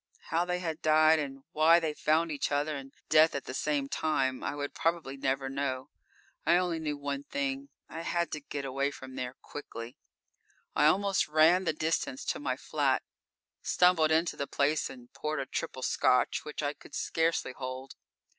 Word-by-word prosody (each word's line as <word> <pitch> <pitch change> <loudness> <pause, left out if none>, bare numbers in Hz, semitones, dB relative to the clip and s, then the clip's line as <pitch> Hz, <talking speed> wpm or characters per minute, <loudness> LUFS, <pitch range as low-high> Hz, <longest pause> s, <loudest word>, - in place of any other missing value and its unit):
How 170 +2 +2
they 180 0 -1
had 165 -3 -4
died 155 0 +5
and 135 -2 -5
why 160 +2 +6
they 160 -2 -1
found 160 +2 +2
each 145 -1 -2
other 145 +2 0
and 135 -1 -8 0.2
death 155 0 +5
at 140 - -2
the - - -7
same 145 0 0
time, 135 -4 0
I 145 - -2
would 145 -1 -4
probably 165 -5 -1
never 135 0 -1
know. 135 0 -3 0.5
I 170 +3 +5
only 175 -2 0
knew 150 -2 -2
one 140 -1 -3
thing: 140 -1 -3 0.2
I 165 - -6
had 170 0 -1
to 150 - -3
get 140 -1 -5
away 135 +1 0
from 130 -2 -10
there 130 -1 -4
quickly. 120 -4 -8 0.8
I 150 - +5
almost 195 +4 +2
ran 160 +4 +5
the - - +3
distance 155 -4 -1
to - - -1
my 130 -3 -2
flat. 140 -2 0 0.6
Stumbled 180 -3 +4
into 160 +2 +2
the 140 - -3
place 145 +2 +1
and 125 -2 -13
poured 155 -1 -2
a 135 - -2
triple 130 0 -4
Scotch 125 - +2
which 150 0 -5
I 145 0 0
could - - -13
scarcely 165 -4 0
hold. 130 0 -6
145 Hz, 185 wpm, -30 LUFS, 135-160 Hz, 0.8 s, why